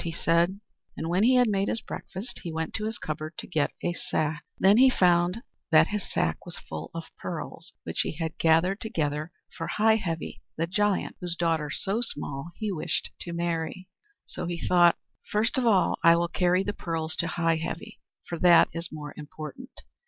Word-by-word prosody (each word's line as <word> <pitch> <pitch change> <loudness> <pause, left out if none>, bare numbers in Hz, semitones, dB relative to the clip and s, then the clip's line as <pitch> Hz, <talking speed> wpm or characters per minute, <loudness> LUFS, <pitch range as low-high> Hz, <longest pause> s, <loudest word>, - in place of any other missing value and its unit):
he 170 - -3
said. 170 +3 +2 0.4
And 160 - -3
when 180 +3 +2
he 250 +4 +5
had 250 -1 +5
had 195 0 +1
his 230 - 0
breakfast, 195 +7 -7
he 170 - -5
went 160 0 -3
to 215 - -2
his 220 +1 -3
cupboard 155 +1 -5
to - - -5
get 155 -5 0
a 175 - 0
sack. 155 -2 -2
Then 195 +3 +5
he 260 +2 +8
found 180 0 +3 0.3
that 160 0 +6
his 210 -1 -4
sack - - 0
was 175 - -8
full - - -7
of 165 -1 -6
pearls 170 +1 -6
which - - -1
he - - -2
had 165 +1 -4
gathered 165 +5 +3
together 155 -6 -2 0.2
for 165 - -4
Heigh 220 +1 +3
Heavy 170 -6 -4 0.2
the 165 - +1
Giant, 205 +3 0
whose 175 -1 -2
daughter 165 -3 0
So 200 +9 -1
Small 145 - -4
he 215 -2 -2
wished 165 -5 -2
to 175 - -5
marry. 170 +1 -2 0.4
So 175 - -5
he 175 0 -2
thought, 175 -1 +6 0.3
"First 215 +2 +1
of 245 - +1
all 200 -5 +3
I 170 -1 +8
will 170 0 +1
carry 180 +1 +2
the 205 - -2
pearls 160 -4 -3
to 170 - 0
Heigh 165 -1 +1
Heavy, 160 +1 -6 0.3
for 170 - -4
that 175 -2 +7
is 170 0 -5
more 150 -1 -7
important." 155 - -9
170 Hz, 195 wpm, -27 LUFS, 160-195 Hz, 0.4 s, he